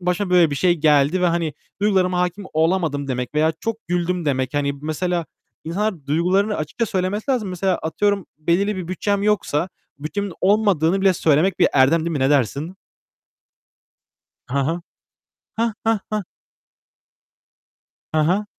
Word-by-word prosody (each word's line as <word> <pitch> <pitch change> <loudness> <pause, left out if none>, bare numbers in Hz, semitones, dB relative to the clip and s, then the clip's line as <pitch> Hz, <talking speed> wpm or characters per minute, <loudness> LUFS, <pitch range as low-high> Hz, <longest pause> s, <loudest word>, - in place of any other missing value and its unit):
başıma 180 +2 -1
böyle 175 -3 +5
bir - - -2
şey 175 +3 +3
geldi 150 +2 +3
ve - - +4
hani 170 -2 0 0.3
duygularıma 185 -3 +2
hâkim 180 +3 -2
olamadım 160 -3 0
demek 125 0 -3
veya 155 +1 +3
çok 225 -1 -2
güldüm 175 -1 -1
demek. 130 -1 -1
Hani, 140 -1 +1
mesela 170 +2 -2 0.4
insanlar 175 -3 -2
duygularını 185 +7 +1
açıkça 155 +10 -2
söylemesi 205 +4 -2
lazım. 235 -7 0
Mesela 185 0 0
atıyorum 200 +4 0
belirli 190 +6 +1
bir 180 -3 -5
bütçem 200 +2 -1
yoksa 190 -6 +1 0.3
bütçemin 195 +6 -4
olmadığını 195 -3 +2
bile 190 -1 +4
söylemek 165 +3 +2
bir - - +5
erdem 140 +5 +4
değil 165 +1 -2
mi? 155 - -2
Ne 135 - +2
dersin? 145 - 0 1.8
Hı 140 - 0
hı. 160 +6 0 0.8
Heh, 230 0 +1
heh, 225 -1 +3
heh. 210 - 0 1.9
Hı 155 - +3
hı. 185 +7 +2
175 Hz, 145 wpm, -21 LUFS, 155-195 Hz, 1.9 s, böyle